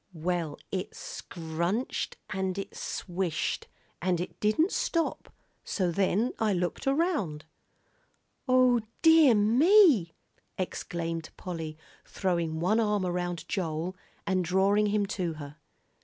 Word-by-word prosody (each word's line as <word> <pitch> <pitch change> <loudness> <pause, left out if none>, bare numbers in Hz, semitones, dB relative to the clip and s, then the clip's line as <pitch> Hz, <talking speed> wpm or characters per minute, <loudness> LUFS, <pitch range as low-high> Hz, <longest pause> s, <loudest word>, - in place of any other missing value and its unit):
"Well, 165 -2 -2
it 185 -1 -3
scrunched 170 +8 -3
an' 190 -1 -1
it 195 - -5
swished, 175 -2 -2 0.3
and 180 0 +1
it 180 - -5
didn't 265 - +2
stop, 335 -1 -1 0.3
so 185 -4 -1
then 200 +6 +1
I 215 -2 +2
looked 180 - -2
around." 270 - 0 1.0
"O 255 -2 +5 0.2
dear 320 -6 +7
me!" 245 - +5 0.4
exclaimed 165 -3 -3
Polly, 160 -4 -5 0.3
throwing 170 -4 -1
one 200 +7 +2
arm 210 -3 +1
around 175 -1 -2
Joel, 175 -1 -2 0.3
and 185 -1 +1
drawing 195 +4 +3
him 205 0 +1
to 185 -4 -2
her. 145 -1 -9
185 Hz, 110 wpm, -29 LUFS, 170-215 Hz, 1.0 s, dear